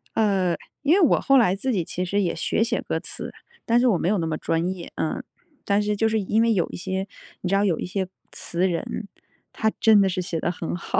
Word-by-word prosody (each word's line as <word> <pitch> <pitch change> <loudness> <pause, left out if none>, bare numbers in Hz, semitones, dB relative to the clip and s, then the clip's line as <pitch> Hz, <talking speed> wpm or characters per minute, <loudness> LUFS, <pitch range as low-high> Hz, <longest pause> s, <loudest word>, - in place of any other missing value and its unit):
呃， 195 -5 +2 0.3
因 290 - +3
为 390 - +5
我 320 - +5
后 275 0 +5
来 195 -6 +4
自 260 +6 -1
己 185 -6 0
其 180 - -3
实 200 +3 0
也 175 -3 0
学 165 +6 +1
写 235 +1 -1
歌 - - -2
词， - - -6 0.3
但 235 +1 +4
是 250 - +3
我 205 - +3
没 175 - 0
有 210 - +2
那 165 -3 -1
么 155 -1 -2
专 165 +1 0
业。 175 -2 -9
嗯， 155 - -2 0.4
但 200 +1 +2
是 210 0 0
就 225 +2 +2
是 220 0 +1
因 210 +2 +1
为 230 0 +3
有 180 -5 +1
一 - - -7
些， 190 +1 -3 0.3
你 180 - -2
知 195 - +2
道 200 - +3
有 180 -6 +1
一 - - -3
些 190 +1 -2 0.2
词 175 +2 0
人， 185 +4 -3 0.5
他 220 0 +1
真 220 -3 +6
的 195 - +3
是 185 0 -2
写 170 -2 -3
得 175 - 0
很 170 -1 -4
好。 175 - -1
195 Hz, 275 characters per minute, -24 LUFS, 180-220 Hz, 0.5 s, 真